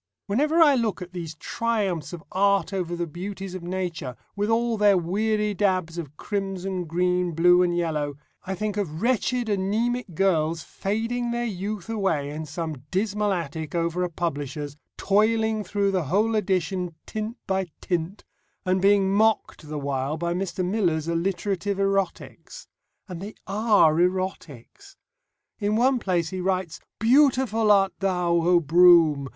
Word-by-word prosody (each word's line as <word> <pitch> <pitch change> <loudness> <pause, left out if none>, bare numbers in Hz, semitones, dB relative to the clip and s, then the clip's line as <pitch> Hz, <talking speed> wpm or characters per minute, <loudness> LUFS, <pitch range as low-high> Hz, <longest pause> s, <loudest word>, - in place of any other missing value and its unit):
Whenever 300 +11 +1
I 295 -3 +6
look 230 -7 0
at 180 +1 -12
these 165 -3 -6
triumphs 195 - -2
of 170 -2 -8
art 200 -1 +2
over 175 -3 -2
the 170 0 -2
beauties 190 +3 -6
of 185 - -6
nature, 175 -7 -4 0.2
with 205 +1 -1
all 230 +1 +1
their 205 -2 +4
weary 210 +4 0
dabs 185 -4 0
of 150 -3 -8
crimson, 195 -2 -3
green, 180 +1 0
blue, 175 +2 +5
and 175 -1 +1
yellow, 150 -4 -2 0.3
I 190 0 -4
think 210 +1 -3
of 170 -3 -3
wretched, 250 0 +1
anæmic 215 +1 -1
girls 165 -3 +1
fading 230 +4 -2
their 240 0 -1
youth 205 -1 -4
away 190 -10 -1
in 155 +1 -6
some 155 -2 -5
dismal 205 +2 0
attic 160 -3 -4
over 170 +1 0
a 180 - -1
publisher's, 145 -3 -4 0.2
toiling 220 +2 +2
through 200 -1 0
the 185 -4 0
whole 210 +9 +1
edition 185 -3 -1
tint 220 +2 -5
by 190 -1 -1
tint, 175 +2 -3 0.4
and 185 0 +1
being 200 0 +4
mocked 215 -7 +1
the 155 - -4
while 140 +1 -2
by 170 +1 -1
Mr. 185 0 -2
Miller's 175 -6 0
alliterative 190 +3 -1
erotics. 195 - -2 0.4
And 180 -3 -7
they 205 +2 -7
are 205 -5 +4
erotics! 185 - -3 0.6
In 205 0 0
one 250 +3 +3
place 175 -6 0
he 185 -1 -4
writes, 185 -2 -1 0.2
"Beautiful 240 -3 +3
art 195 -1 +4
thou, 180 -3 0
O 175 +1 +4
Broom! 165 -3 +5
190 Hz, 150 wpm, -25 LUFS, 170-210 Hz, 0.6 s, I